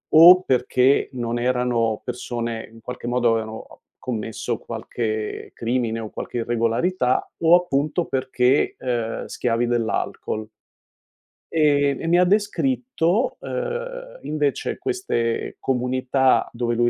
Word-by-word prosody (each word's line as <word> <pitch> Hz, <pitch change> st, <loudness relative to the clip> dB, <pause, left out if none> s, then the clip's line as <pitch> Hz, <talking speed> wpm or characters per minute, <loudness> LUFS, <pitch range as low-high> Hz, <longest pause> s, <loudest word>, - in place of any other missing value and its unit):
o 175 Hz, +3 st, +10 dB
perché 130 Hz, -2 st, +2 dB
non 120 Hz, -1 st, -2 dB
erano 120 Hz, -3 st, 0 dB
persone 120 Hz, -2 st, -4 dB
in 115 Hz, 0 st, -15 dB
qualche 125 Hz, 0 st, -7 dB
modo 120 Hz, -1 st, +2 dB
avevano 110 Hz, 0 st, -5 dB, 0.2 s
commesso 115 Hz, -3 st, -3 dB
qualche 110 Hz, -2 st, -4 dB
crimine 115 Hz, -1 st, -1 dB
o 110 Hz, -2 st, -6 dB
qualche -, -, -6 dB
irregolarità, 120 Hz, +5 st, 0 dB
o 165 Hz, +1 st, +6 dB
appunto 165 Hz, -1 st, +1 dB
perché, 130 Hz, 0 st, +1 dB
ehm, 120 Hz, -3 st, -2 dB
schiavi 120 Hz, 0 st, -1 dB
dell'alcol." 110 Hz, -2 st, -2 dB, 1.0 s
Ehm, 145 Hz, -3 st, +2 dB
e 165 Hz, -, -3 dB
mi 175 Hz, -, +4 dB
ha -, -, +6 dB
descritto, 210 Hz, +1 st, +1 dB
ehm, -, -, -5 dB
invece 150 Hz, -3 st, -1 dB
queste 370 Hz, -, -2 dB
comunità 130 Hz, +1 st, +1 dB
dove 120 Hz, 0 st, -1 dB
lui 120 Hz, +1 st, +3 dB
125 Hz, 115 wpm, -23 LUFS, 115-165 Hz, 1.0 s, o